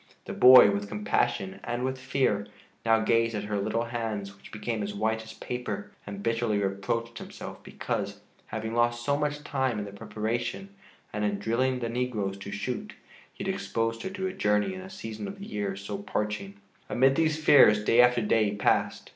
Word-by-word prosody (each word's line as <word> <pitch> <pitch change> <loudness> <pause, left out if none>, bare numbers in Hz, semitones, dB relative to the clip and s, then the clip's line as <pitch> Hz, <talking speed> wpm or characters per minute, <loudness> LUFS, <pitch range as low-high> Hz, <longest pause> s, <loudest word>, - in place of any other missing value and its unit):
The - - -5
boy, 125 -5 +9
with 100 0 -3
compassion 105 -2 -1
and 120 +1 -2
with 130 0 -2
fear, 125 -6 0 0.4
now 115 -1 +4
gazed 115 0 +2
at 105 - -2
her 105 -1 -2
little 110 +3 0
hands, 110 -4 -4
which 95 - -15
became 110 +1 -3
as 105 0 -4
white 110 +2 0
as 110 0 -10
paper, 125 -4 -5 0.2
and 100 0 -6
bitterly 115 -2 +1
reproached 100 +4 -2
himself - - -9
because, - - -4 0.3
having 110 0 -4
lost 120 0 +1
so 140 - +2
much 145 0 -2
time 130 -5 -1
in 105 - -3
the 100 - -8
preparation 110 - -3 0.4
and 105 0 -2
in 105 -1 0
drilling 125 +5 0
the 120 - -1
negroes 115 -5 -2
to 95 - -7
shoot, 120 +4 -4 0.4
he - - -8
had - - 0
exposed 115 0 -2
her - - -3
to 190 0 -4
a 185 - -2
journey 105 - +1
in 185 - -7
a 190 - -9
season 190 - -6
of 200 +1 -7
the 200 - -8
year 100 - -3
so 100 - -5
parching. 195 - -3 0.3
Amid 135 +2 +4
these 155 -1 +2
fears 105 -9 +6
day 120 +3 +6
after 125 -1 +4
day 105 -1 +2
passed. 105 - +1
115 Hz, 190 wpm, -28 LUFS, 105-125 Hz, 0.4 s, boy